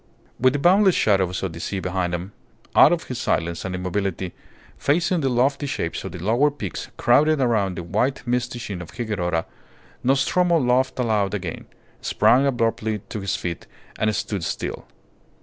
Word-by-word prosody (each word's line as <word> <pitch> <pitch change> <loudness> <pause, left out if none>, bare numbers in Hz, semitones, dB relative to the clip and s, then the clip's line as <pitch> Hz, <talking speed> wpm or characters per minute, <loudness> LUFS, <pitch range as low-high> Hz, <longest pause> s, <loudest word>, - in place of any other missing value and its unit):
With 130 +1 +4
the - - +1
boundless 185 +5 +5
shadows 95 -4 +2
of 95 -4 -2
the 85 - -8
sea 95 +3 -3
behind 90 -1 -1
him, 90 +3 -6 0.4
out - - +8
of - - 0
his - - -6
silence 85 0 -1
and 95 -1 -3
immobility, 90 0 -2 0.5
facing 170 +3 +1
the 135 - +1
lofty 135 +4 +1
shapes 85 -10 -3
of 95 - -6
the 90 - -7
lower 115 - +2
peaks 110 -10 -6
crowded 150 +5 +4
around 110 -8 +1
the 85 - -4
white, 120 +10 -1
misty 125 0 -1
sheen 100 -6 -5
of 90 - -9
Higuerota, 90 -8 -1 0.6
Nostromo 140 +7 +3
laughed 130 0 +1
aloud 105 -5 +1
again, 90 -5 -5 0.3
sprang 135 +3 +3
abruptly 115 -4 0
to 110 - -4
his 95 0 -1
feet, 85 -2 -5 0.3
and 110 -1 +1
stood 100 -2 -3
still. - - -4
110 Hz, 165 wpm, -23 LUFS, 90-130 Hz, 0.6 s, out